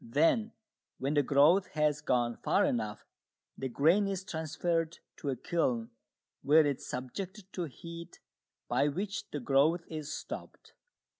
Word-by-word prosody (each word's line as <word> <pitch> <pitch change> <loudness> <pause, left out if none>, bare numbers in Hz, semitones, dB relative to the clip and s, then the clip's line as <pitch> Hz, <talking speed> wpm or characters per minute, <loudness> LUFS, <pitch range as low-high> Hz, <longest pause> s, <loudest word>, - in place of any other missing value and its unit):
Then, 165 - +2 0.4
when 135 +3 -1
the 145 - +4
growth 145 +8 +5
has 150 -1 +1
gone 120 -4 +1
far - - +2
enough, 110 -3 -2 0.5
the 135 - -4
grain 165 - +4
is 195 -1 -2
transferred 165 -1 -1 0.2
to 145 - -4
a 135 - 0
kiln, 125 -5 -1 0.5
where 155 +3 +6
it 140 -3 +1
is - - -10
subjected 190 - -6
to 180 - -2
heat, 170 +3 -9 0.5
by 130 +4 +2
which 195 +8 -3
the 145 - -4
growth 145 +6 +3
is 155 -2 -5
stopped. - - -7
155 Hz, 145 wpm, -31 LUFS, 135-175 Hz, 0.5 s, where